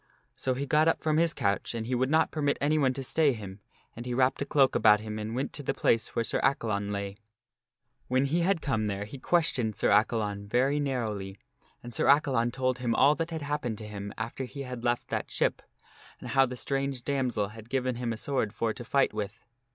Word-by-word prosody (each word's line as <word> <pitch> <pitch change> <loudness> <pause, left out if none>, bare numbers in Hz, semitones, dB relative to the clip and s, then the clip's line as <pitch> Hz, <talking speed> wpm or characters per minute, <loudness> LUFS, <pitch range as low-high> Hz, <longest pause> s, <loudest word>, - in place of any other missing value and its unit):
So 130 -1 -1
he 140 +2 -2
got 150 +3 +3
up 165 - +1
from 155 -1 +2
his 165 0 +4
couch 100 -3 -1
and 115 -1 -3
he 125 - -3
would 130 +1 +1
not 160 +2 +3
permit 145 -2 0
anyone 145 -2 +2
to 135 - -4
stay 145 +2 +2
him, 100 -3 -8 0.4
and 120 - -7
he 125 0 -3
wrapped 130 +2 +2
a 140 - -2
cloak 135 -3 +4
about 105 -1 +5
him 110 0 -5
and 110 +2 -4
went 135 +2 -2
to 145 - -5
the 140 - -2
place 115 - +1
where 115 - +1
Sir - - -1
Accalon 110 -7 0
lay. 100 0 -4 0.9
When 130 +2 +2
he 155 +5 +1
had 175 -1 +1
come 110 -6 0
there 100 0 -3
he 130 +6 -9
questioned 130 - +1
Sir - - +1
Accalon 105 -1 +1
very 130 +6 +2
narrowly 110 -8 -3 0.5
and 120 0 -8
Sir - - 0
Accalon 135 -5 +3
told 130 0 -1
him 120 -2 0
all 140 +3 +6
that 165 +2 -3
had 160 -3 -4
happened 140 -6 -2
to 110 - -7
him 100 -1 -6
after 115 +4 -4
he 140 +2 -7
had 125 -2 -7
left 120 0 0
that - - -2
ship, - - 0 0.6
and - - -8
how 135 -1 +4
the 125 0 -6
strange 135 -1 -2
damsel 125 -7 0
had 110 +1 -12
given 130 -2 -1
him 120 -1 -2
a 115 - -3
sword 125 -5 -1
for 115 -1 0
to 120 - -8
fight 135 +2 +2
with. 105 0 -4
125 Hz, 225 wpm, -29 LUFS, 110-140 Hz, 0.9 s, all